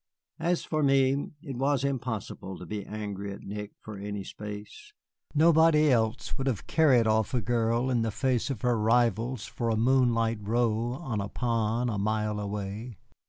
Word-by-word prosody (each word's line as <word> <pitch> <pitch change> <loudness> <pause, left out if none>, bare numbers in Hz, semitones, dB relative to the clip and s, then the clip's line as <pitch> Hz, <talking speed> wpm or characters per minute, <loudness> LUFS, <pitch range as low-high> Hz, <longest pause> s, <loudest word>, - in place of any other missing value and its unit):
As 175 0 0
for 155 -1 -1
me, 135 0 +3 0.2
it 135 -7 -6
was 135 0 +1
impossible 115 -8 -3
to 90 - -9
be 100 +2 -5
angry 100 -2 -5
at - - -11
Nick 105 +1 -6
for 105 -2 -9
any 100 0 -4
space. 105 - -9 0.4
Nobody 155 -1 +5
else 115 +1 0
would 135 - -1
have 120 -7 -1
carried 135 -8 +4
off 110 +2 +1
a - - +3
girl 120 +2 +1
in 120 -2 +2
the 115 - 0
face 125 +3 0
of 130 -6 -3
her 120 -2 +2
rivals 115 +1 +1
for 115 -2 -3
a 110 - +1
moonlight 115 -2 +2
row 115 +2 0
on 125 -7 -3
a 100 - -4
pond 115 0 0
a 105 - -2
mile 105 0 0
away. 105 +2 -5
115 Hz, 170 wpm, -28 LUFS, 105-130 Hz, 0.4 s, Nobody